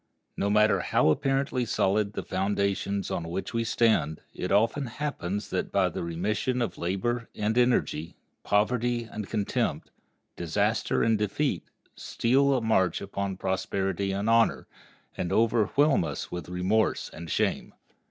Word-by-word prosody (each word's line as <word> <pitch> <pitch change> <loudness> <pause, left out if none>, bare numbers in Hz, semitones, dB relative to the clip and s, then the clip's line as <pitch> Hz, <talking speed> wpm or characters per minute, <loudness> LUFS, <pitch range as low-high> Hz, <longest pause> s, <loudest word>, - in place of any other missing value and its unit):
No 100 - 0
matter 105 +1 +4
how - - +2
apparently 135 - +1
solid 105 -2 +1
the - - -4
foundations 100 0 -1
on 85 -1 -3
which 95 +6 -4
we 115 0 0
stand, 110 -10 +2
it 90 - -4
often 115 +7 +2
happens 105 - -4
that - - -2
by - - +2
the - - -5
remission 100 +9 -1
of 120 - -2
labor 115 +7 -2
and 105 +1 -1
energy, 120 -10 +1 0.3
poverty 120 +3 +1
and 110 -3 -7
contempt, 105 -3 -1 0.4
disaster 100 +6 0
and 110 -2 +2
defeat 105 +8 -1 0.3
steal 135 +3 +2
a - - -1
march 95 -6 +2
upon 100 -1 -4
prosperity 95 0 -1
and 100 +2 -2
honor, 115 0 +3 0.5
and 90 - -3
overwhelm 115 - +3
us - - -5
with 85 -2 -6
remorse 95 +5 0
and 85 +1 -8
shame. - - -1
105 Hz, 140 wpm, -27 LUFS, 95-115 Hz, 0.5 s, matter